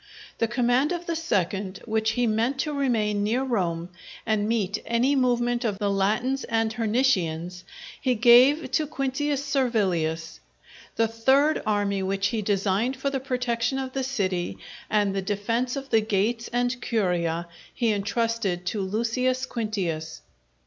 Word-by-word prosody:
The 230 - +2
command 245 +5 +2
of 345 -1 -3
the 335 - -2
second, 200 - -1
which 220 -1 0
he 245 +1 +1
meant 230 +4 +1
to 300 - -3
remain 225 -7 0
near 230 +6 +1
Rome 175 -9 -1 0.4
and 215 -1 0
meet 210 -3 0
any 245 +5 +1
movement 245 -1 +1
of 210 -4 -1
the 200 0 0
Latins 220 +7 0
and 225 -1 0
Hernicians, 185 -8 0 0.4
he 255 -2 +1
gave 250 +6 +6
to 310 -2 +1
Quintius 280 0 -2
Servilius. 185 - 0 0.6
The 225 - +2
third 265 +7 +2
army, 205 -2 +1
which 195 +1 0
he 225 -2 -1
designed 200 +5 0
for 275 +1 -2
the 270 - -1
protection 250 -1 -1
of 260 -1 -4
the 270 - -1
city, 185 - -2 0.3
and 205 -2 +1
the 195 - 0
defence 230 +6 -1
of 275 -1 -6
the 225 -1 +5
gates 220 +3 0
and 245 +1 0
Curia, 175 -7 0 0.2
he 235 -3 0
entrusted 205 -3 -1
to 200 +3 -2
Lucius 235 +6 0
Quintius. 195 -10 -3
225 Hz, 150 wpm, -25 LUFS, 200-255 Hz, 0.6 s, gave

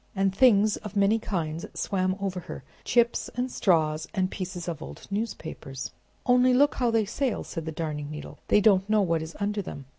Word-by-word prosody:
And 195 0 +2
things 215 -3 +5
of 210 -2 -9
many 200 +3 +3
kinds 165 -6 -3
swam 185 -2 0
over 190 -2 -2
her, 160 - -8 0.2
chips 235 -1 +2
and 250 +1 -1
straws 160 -3 +2
and 185 -1 +1
pieces 180 -2 -5
of 165 -3 -4
old - - -9
newspapers. 165 - -4 0.3
"Only 250 0 +5
look 285 +3 +5
how 245 -2 +1
they 225 -2 +2
sail!" 250 +3 -1
said 165 -3 -6
the - - -2
Darning 150 -2 -4
Needle. 150 0 -8
"They 210 - +5
don't 195 -1 +4
know 215 -1 +4
what 165 -3 +1
is 160 +1 -7
under 205 0 -1
them! 140 -7 -8
195 Hz, 190 wpm, -27 LUFS, 165-215 Hz, 0.3 s, things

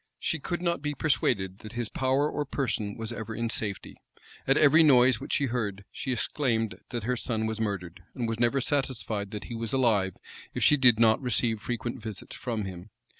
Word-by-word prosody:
She 160 - -1
could 175 +4 -3
not 170 -3 0
be 150 0 -2
persuaded 100 - 0
that 110 +1 -10
his 120 -2 -2
power 135 +5 +1
or 150 - -2
person 120 -7 -2
was 115 0 -5
ever 115 -1 -5
in 115 0 -1
safety. 100 -4 -3 0.5
At 135 +2 +4
every 155 +2 +7
noise 130 -5 +6
which 135 - -5
she 140 - +2
heard, 105 -6 -3
she 130 - -4
exclaimed 115 -3 0
that 120 -3 -4
her 125 +3 0
son 115 -2 -2
was 110 0 -3
murdered; 90 -4 -3
and 120 -2 -2
was 115 0 -3
never 120 +3 +2
satisfied 125 -7 -1
that 105 0 -6
he 120 - -8
was 115 +2 -4
alive, 105 -8 +2 0.4
if - - 0
she 150 - +6
did 125 -5 +5
not 110 +1 +5
receive 115 -3 +1
frequent 120 +1 -4
visits 110 -3 -7
from 115 -4 -3
him. 95 +1 -8
115 Hz, 200 wpm, -28 LUFS, 110-130 Hz, 0.5 s, every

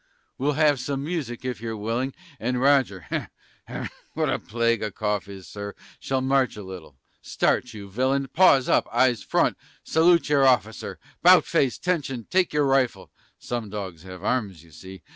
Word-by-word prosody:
We'll 145 +3 +1
have 150 -2 +3
some 135 +2 -3
music, 145 -7 -4
if 125 -5 -4
you're 115 -1 -4
willing, 115 +5 -2 0.2
And 125 +2 -1
Roger 130 -8 +3
(hem! - - -7 0.3
what - - 0
a - - 0
plague 115 0 0
a 110 - -1
cough 105 0 -2
is, 95 -2 -10
Sir!) 100 0 -7 0.2
Shall 135 -1 -1
march 130 -1 +1
a 105 - -7
little 90 -8 -10 0.2
Start, 120 -3 0
you 100 -2 -8
villain! 130 +6 0
Paws 140 -4 +4
up! - - +3
Eyes 125 -5 +3
front! - - +1 0.3
Salute 170 +1 +3
your 140 -2 +4
officer! 110 -4 0 0.2
'Bout - - +7
face! 135 -3 +1
Attention! 140 -10 -2
Take 185 -1 +2
your 150 -1 +2
rifle! 135 -2 +1 0.3
(Some 120 -3 -5
dogs 95 -6 -6
have 90 0 -10
arms, 105 -9 -1
you 85 - -19
see!) 95 +3 -12
125 Hz, 170 wpm, -25 LUFS, 100-135 Hz, 0.3 s, Bout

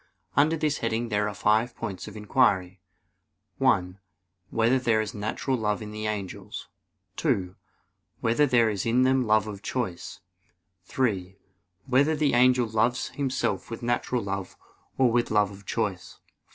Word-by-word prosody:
Under 150 +4 +4
this 150 -2 0
heading 115 +1 -1
there 105 0 +1
are 105 - -8
five 110 +4 +2
points 100 -5 -5
of 105 0 -9
inquiry: 100 -5 +1 0.8
(1) 100 -8 +2 0.5
Whether 115 +4 +2
there 115 -3 +2
is 110 -1 -2
natural 110 +5 -2
love 105 -3 -1
in 105 -1 -7
the 110 0 -4
angels? 100 -4 -5 0.5
(2) 90 -1 0 0.6
Whether 120 +6 +2
there 120 -3 +4
is 100 -3 -2
in 120 +3 +3
them 130 -2 +2
love 110 -1 +4
of 100 -2 -7
choice? 105 -10 -4 0.7
(3) 95 -6 -1 0.5
Whether 140 +4 +3
the 150 -2 +1
angel 125 0 +4
loves 115 +3 0
himself 130 -8 -2
with 115 +1 -7
natural 120 0 0
love 100 -1 -5 0.4
or 130 -3 +4
with 120 +1 +1
love 105 -1 +2
of 100 0 -14
choice? 100 -6 -3
110 Hz, 150 wpm, -26 LUFS, 105-125 Hz, 0.8 s, Under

